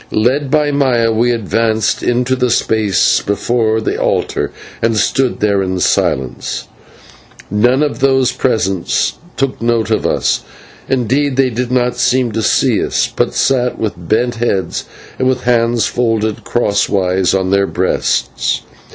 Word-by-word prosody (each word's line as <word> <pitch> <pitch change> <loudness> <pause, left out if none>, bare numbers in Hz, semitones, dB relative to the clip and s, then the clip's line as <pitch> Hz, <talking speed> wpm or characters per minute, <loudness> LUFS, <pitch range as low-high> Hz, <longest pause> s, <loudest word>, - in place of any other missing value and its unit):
Led 130 +6 +1
by 150 0 +2
Maya 125 -5 +2
we 115 +2 +1
advanced 110 -1 0
into 125 +1 +1
the 125 -1 0
space 110 -5 +2
before 110 +2 0
the 110 - -2
altar, - - 0 0.3
and 115 -1 +1
stood 130 +4 0
there 100 -2 +2
in 95 -1 -2
silence. 65 -6 -1 0.9
None 120 +7 +3
of 150 - -2
those 135 -2 +3
present 95 -7 0 0.3
took 135 -3 -2
note 115 -1 0
of 110 - +1
us; - - +1 0.5
indeed, 135 +2 +1
they 130 -1 +2
did 120 +2 -3
not 125 -1 +1
seem 130 -2 +1
to 110 +1 -2
see - - +2
us, - - -1
but - - 0
sat 125 -2 +1
with 110 -2 -2
bent 110 +8 -1
heads 115 -5 -1 0.3
and 130 - +1
with 130 -1 0
hands 120 -1 +2
folded 110 -3 -1
crosswise 95 -5 +1
on 95 -1 0
their 100 0 +2
breasts. 60 -1 -1
115 Hz, 145 wpm, -15 LUFS, 105-125 Hz, 0.9 s, None